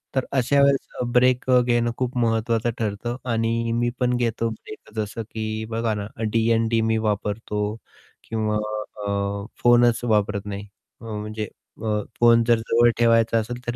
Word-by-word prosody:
तर 130 Hz, -, +1 dB
अशा 140 Hz, +1 st, +3 dB
वेळेस 135 Hz, -2 st, +1 dB
ब्रेक 125 Hz, +1 st, +3 dB
अ, 125 Hz, -1 st, +6 dB
घेणं 120 Hz, -1 st, +1 dB
खूप 125 Hz, 0 st, -2 dB
महत्त्वाचं 115 Hz, 0 st, +1 dB
ठरतं 110 Hz, +2 st, -2 dB, 0.2 s
आणि 115 Hz, +1 st, 0 dB
मी 120 Hz, +1 st, +1 dB
पण 125 Hz, -1 st, +2 dB
घेतो 115 Hz, -1 st, 0 dB
ब्रेकच 110 Hz, 0 st, -11 dB
असं 105 Hz, +2 st, -6 dB
की 110 Hz, 0 st, -4 dB
बघा 115 Hz, -1 st, -1 dB
ना 100 Hz, 0 st, -4 dB, 0.2 s
डी-एन-डी 115 Hz, 0 st, +2 dB
मी 110 Hz, 0 st, +1 dB
वापरतो. 105 Hz, 0 st, -2 dB, 0.5 s
किंवा 110 Hz, -1 st, 0 dB, 0.5 s
अ, 100 Hz, 0 st, -2 dB, 0.2 s
फोनच 120 Hz, 0 st, +4 dB
वापरत 105 Hz, -3 st, +1 dB
नाही. 100 Hz, 0 st, -6 dB, 0.3 s
म्हणजे 110 Hz, -1 st, -5 dB, 0.4 s
अ, 105 Hz, -1 st, +1 dB, 0.2 s
फोन 115 Hz, -1 st, +6 dB
जर 120 Hz, 0 st, +4 dB
जवळ 115 Hz, +1 st, +3 dB
ठेवायचा 115 Hz, -1 st, +3 dB
असेल 120 Hz, +3 st, -4 dB
तर 120 Hz, -, -2 dB
115 Hz, 150 wpm, -23 LUFS, 110-120 Hz, 0.5 s, अ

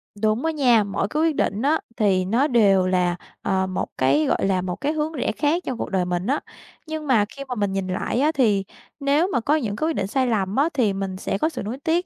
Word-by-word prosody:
Đúng 215 Hz, +5 st, 0 dB
á 325 Hz, -, +2 dB
nha. 250 Hz, -8 st, +4 dB
Mỗi 200 Hz, 0 st, -2 dB
cái 300 Hz, +8 st, -1 dB
quyết 325 Hz, -2 st, +2 dB
định 205 Hz, -4 st, 0 dB
á, 300 Hz, +5 st, +2 dB, 0.2 s
thì 190 Hz, -4 st, +2 dB
nó 235 Hz, +9 st, +2 dB
đều 200 Hz, -7 st, +4 dB
là, 180 Hz, -1 st, +1 dB, 0.3 s
ờ, 190 Hz, -1 st, 0 dB
một 185 Hz, -, -2 dB
cái, 140 Hz, +4 st, +3 dB
gọi -, -, +1 dB
là, 190 Hz, -2 st, +1 dB
một 180 Hz, -1 st, -3 dB
cái 290 Hz, +2 st, +1 dB
hướng 310 Hz, +1 st, -2 dB
rẽ 270 Hz, -, -1 dB
khác 320 Hz, +4 st, 0 dB
trong 255 Hz, -, -3 dB
cuộc -, -, -4 dB
đời 185 Hz, -2 st, 0 dB
mình 180 Hz, +2 st, -2 dB
á. 280 Hz, +4 st, +1 dB, 0.5 s
Nhưng 315 Hz, -1 st, -5 dB
mà 230 Hz, -6 st, +4 dB
khi 275 Hz, +6 st, -9 dB
mà 250 Hz, -, -3 dB
mình 205 Hz, -3 st, -1 dB
nhìn 195 Hz, -1 st, -2 dB
lại 185 Hz, +5 st, -2 dB
á, 300 Hz, +3 st, +3 dB
thì 220 Hz, -10 st, +2 dB, 0.4 s
nếu 285 Hz, +4 st, +2 dB
mà -, -, +2 dB
có 290 Hz, +6 st, +2 dB
những 225 Hz, -10 st, -2 dB
cái 310 Hz, -, -1 dB
quyết -, -, 0 dB
định 190 Hz, -, -1 dB
sai 260 Hz, +5 st, 0 dB
lầm 200 Hz, -4 st, 0 dB
á, 285 Hz, +4 st, +3 dB
thì 235 Hz, -8 st, +2 dB
mình 195 Hz, -1 st, -4 dB
sẽ 195 Hz, -, -2 dB
có 315 Hz, -, +1 dB
sự 320 Hz, -, -6 dB
nuối 220 Hz, +5 st, -4 dB
tiếc, 340 Hz, +3 st, +1 dB
225 Hz, 265 wpm, -23 LUFS, 195-290 Hz, 0.5 s, nha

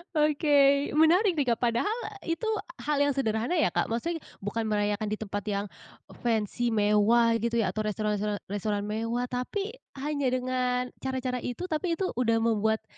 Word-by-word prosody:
Oke, 300 Hz, 0 st, +2 dB, 0.4 s
menarik 335 Hz, +4 st, +4 dB
nih 275 Hz, -, +1 dB
Kak, 235 Hz, 0 st, +1 dB
padahal 245 Hz, -, +1 dB, 0.3 s
itu 330 Hz, +6 st, -2 dB, 0.4 s
hal 295 Hz, -1 st, 0 dB
yang 285 Hz, -1 st, +2 dB
sederhana 235 Hz, +4 st, 0 dB
ya 315 Hz, -, +2 dB
Kak, -, -, 0 dB
maksudnya 325 Hz, +9 st, -2 dB, 0.2 s
bukan 220 Hz, +2 st, -2 dB
merayakan 210 Hz, 0 st, 0 dB
di 210 Hz, -, -1 dB
tempat 205 Hz, -2 st, -4 dB
yang 200 Hz, 0 st, -1 dB, 0.5 s
fancy 230 Hz, 0 st, 0 dB
mewah 220 Hz, +2 st, +4 dB
gitu 235 Hz, +1 st, -1 dB
ya -, -, 0 dB
atau -, -, -5 dB
restoran 210 Hz, -1 st, -1 dB
toran 210 Hz, 0 st, -1 dB, 0.2 s
restoran 205 Hz, 0 st, -1 dB
mewah, 230 Hz, +3 st, -2 dB
tapi 390 Hz, -, -2 dB, 0.2 s
hanya 285 Hz, 0 st, -1 dB
dengan 250 Hz, 0 st, 0 dB
cara-cara 260 Hz, -1 st, -2 dB
itu, 245 Hz, +7 st, -5 dB
tapi 335 Hz, 0 st, -1 dB
itu 380 Hz, +1 st, -1 dB
udah 230 Hz, -2 st, +1 dB
membuat, 220 Hz, -1 st, +1 dB
240 Hz, 160 wpm, -28 LUFS, 215-285 Hz, 0.5 s, menarik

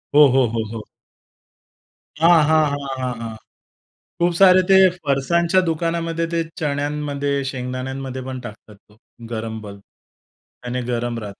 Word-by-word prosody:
हो, 150 Hz, -1 st, +8 dB
हो, 130 Hz, 0 st, +3 dB
हो, 115 Hz, -1 st, -1 dB
हो. 110 Hz, -, -5 dB, 1.4 s
हां, 165 Hz, -1 st, +6 dB
हां, 155 Hz, 0 st, +4 dB
हां, 140 Hz, -1 st, -4 dB
हां, 125 Hz, -1 st, -2 dB
हां. 110 Hz, -1 st, -6 dB, 0.9 s
खूप 175 Hz, 0 st, +3 dB
सारे 185 Hz, -1 st, +7 dB
ते 190 Hz, -, +8 dB, 0.3 s
फरसाणच्या 170 Hz, +6 st, +2 dB
दुकानामध्ये 165 Hz, 0 st, -1 dB
ते 165 Hz, 0 st, +1 dB, 0.2 s
चण्यांमध्ये, 145 Hz, -1 st, -2 dB
शेंगदाण्यांमध्ये 130 Hz, 0 st, -5 dB
पण 130 Hz, -1 st, -5 dB
टाकतात 110 Hz, -3 st, -11 dB
तो 105 Hz, +1 st, -26 dB, 0.3 s
गरम 110 Hz, -1 st, -4 dB
बल्ब 100 Hz, -1 st, -10 dB
त्याने 125 Hz, +4 st, -11 dB
गरम 120 Hz, 0 st, -2 dB
राहतं. 100 Hz, -2 st, -9 dB
135 Hz, 130 wpm, -21 LUFS, 120-160 Hz, 1.4 s, हो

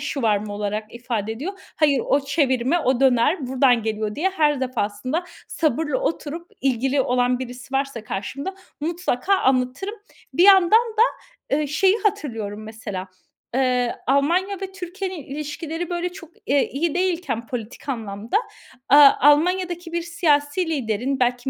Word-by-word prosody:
shawarma 215 Hz, -7 st, -1 dB
olarak 210 Hz, +2 st, -4 dB
ifade 230 Hz, -3 st, -3 dB
ediyor. 285 Hz, -, -5 dB, 0.2 s
"Hayır, 285 Hz, -5 st, +3 dB
o 280 Hz, -, +3 dB
çevirme, 275 Hz, 0 st, +1 dB
o 260 Hz, -5 st, +1 dB
döner 265 Hz, +3 st, +3 dB
buradan 255 Hz, -2 st, +3 dB
geliyor." 215 Hz, -1 st, -2 dB
diye 365 Hz, -, 0 dB
her 300 Hz, -7 st, +1 dB
defasında 255 Hz, -, -2 dB, 0.2 s
sabırla 315 Hz, -, 0 dB
oturup 335 Hz, -7 st, -3 dB
ilgili 270 Hz, +1 st, +1 dB
olan 250 Hz, -1 st, +1 dB
birisi 255 Hz, +1 st, -8 dB
varsa 270 Hz, -4 st, -1 dB
karşımda 255 Hz, -, -4 dB, 0.3 s
mutlaka 340 Hz, +1 st, 0 dB
anlatırım. 265 Hz, -, 0 dB, 0.4 s
Bir 350 Hz, -, +4 dB
yandan 380 Hz, -3 st, +7 dB
da, 445 Hz, -1 st, +4 dB, 0.6 s
eee, 300 Hz, 0 st, 0 dB
şeyi 380 Hz, +8 st, +3 dB
hatırlıyorum 225 Hz, -, -2 dB
mesela, 215 Hz, -4 st, -6 dB, 0.5 s
eee, 250 Hz, -2 st, +1 dB
Almanya 345 Hz, +9 st, +1 dB
ve 385 Hz, -1 st, -5 dB
Türkiye'nin 375 Hz, -2 st, -6 dB
ilişkileri, 305 Hz, +4 st, -5 dB
böyle, 350 Hz, 0 st, -2 dB
çok, 355 Hz, -3 st, -12 dB, 0.2 s
eee, 280 Hz, 0 st, +2 dB
iyi 315 Hz, +3 st, -1 dB
değilken 335 Hz, -11 st, -1 dB
politik 245 Hz, +3 st, -6 dB
anlamda, 220 Hz, -, -2 dB, 0.5 s
aaa, 285 Hz, 0 st, +9 dB
Almanya'daki 350 Hz, +3 st, +3 dB
bir 340 Hz, 0 st, -1 dB
siyasi 335 Hz, -1 st, +1 dB
liderin, 260 Hz, -2 st, -1 dB
belki 245 Hz, +1 st, 0 dB
280 Hz, 135 wpm, -22 LUFS, 245-340 Hz, 0.6 s, aaa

